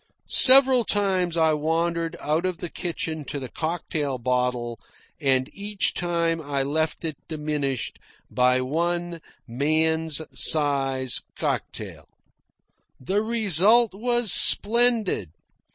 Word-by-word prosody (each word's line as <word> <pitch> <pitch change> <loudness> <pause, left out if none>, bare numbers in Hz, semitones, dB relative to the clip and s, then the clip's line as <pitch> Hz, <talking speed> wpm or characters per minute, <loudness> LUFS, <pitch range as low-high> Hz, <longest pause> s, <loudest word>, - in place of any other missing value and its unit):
Several 260 -1 +6
times 190 -5 -1
I 160 -1 +2
wandered 165 +2 -2
out 155 +3 -1
of 185 -2 -3
the 175 -1 -7
kitchen 160 -3 -5
to 145 - -5
the 130 -2 -8
cocktail 155 -4 -4
bottle, 125 -1 -2 0.4
and 130 -3 +1
each 200 0 -1
time 170 -2 -2
I 140 -2 -2
left 155 +4 -2
it 155 -3 -4
diminished 150 -4 -4 0.3
by 125 0 +2
one 170 +4 -3 0.3
man's 160 +5 -1
size 135 -4 +1
cocktail. - - -5 0.9
The 190 +11 -1
result 220 0 +4
was 240 0 0
splendid. 225 - +2
160 Hz, 105 wpm, -23 LUFS, 140-185 Hz, 0.9 s, Several